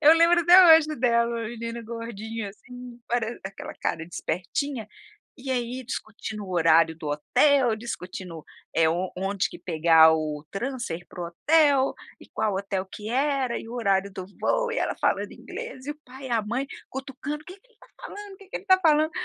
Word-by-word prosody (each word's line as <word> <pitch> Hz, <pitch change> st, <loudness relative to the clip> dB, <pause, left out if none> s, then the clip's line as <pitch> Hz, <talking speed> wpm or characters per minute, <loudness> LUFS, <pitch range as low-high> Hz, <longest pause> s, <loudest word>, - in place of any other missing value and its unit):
eu 305 Hz, +1 st, +9 dB
lembro 335 Hz, +1 st, +5 dB
até 350 Hz, -1 st, +9 dB
hoje 315 Hz, -1 st, +1 dB
dela, 235 Hz, -1 st, +2 dB
a 225 Hz, -, -4 dB
menina 230 Hz, 0 st, -6 dB
gordinha, 225 Hz, -1 st, -6 dB
assim, 245 Hz, +3 st, -12 dB
parece 235 Hz, -1 st, -1 dB
aquela 195 Hz, 0 st, -7 dB
cara 160 Hz, -, -3 dB
de 175 Hz, -, -13 dB
espertinha, 225 Hz, -, -3 dB, 0.5 s
e 265 Hz, -1 st, -7 dB
aí 250 Hz, 0 st, -2 dB
discutindo 220 Hz, -3 st, -6 dB
o 185 Hz, -, -7 dB
horário 165 Hz, -1 st, +4 dB
do 155 Hz, -2 st, -6 dB
hotel, 245 Hz, -, +3 dB
discutindo, 185 Hz, -7 st, -7 dB, 0.3 s
eh, 165 Hz, -, +4 dB, 0.3 s
onde 195 Hz, +1 st, -1 dB
que -, -, -10 dB
pegar 160 Hz, -1 st, +5 dB
o 155 Hz, -1 st, -3 dB
transfer 235 Hz, -6 st, -4 dB
para 175 Hz, -, -7 dB
o -, -, -3 dB
hotel, 285 Hz, -, +3 dB, 0.3 s
e -, -, -15 dB
qual 215 Hz, -2 st, -1 dB
hotel 195 Hz, 0 st, -2 dB
que 210 Hz, +2 st, -8 dB
era, 265 Hz, -2 st, 0 dB
e -, -, -9 dB
o -, -, -8 dB
horário 200 Hz, -4 st, +1 dB
do 190 Hz, -1 st, -6 dB, 0.2 s
voo -, -, +1 dB
e 470 Hz, -, -1 dB
ela -, -, -1 dB
falando -, -, 0 dB
inglês 470 Hz, -, -8 dB
e -, -, -2 dB
o 295 Hz, -, -7 dB
pai 265 Hz, +2 st, -10 dB
e -, -, -9 dB
a 230 Hz, -1 st, +2 dB
mãe 240 Hz, +6 st, -2 dB, 0.2 s
cutucando, 270 Hz, +3 st, -6 dB
"Que 370 Hz, +4 st, -11 dB
que 390 Hz, -, -32 dB
ele 485 Hz, -, -31 dB
está 445 Hz, -, -21 dB
falando, 410 Hz, -5 st, -9 dB
que 390 Hz, -1 st, -17 dB
ele -, -, -4 dB
está 375 Hz, -1 st, +5 dB
falando", 310 Hz, -2 st, +4 dB
235 Hz, 190 wpm, -26 LUFS, 195-285 Hz, 0.5 s, eu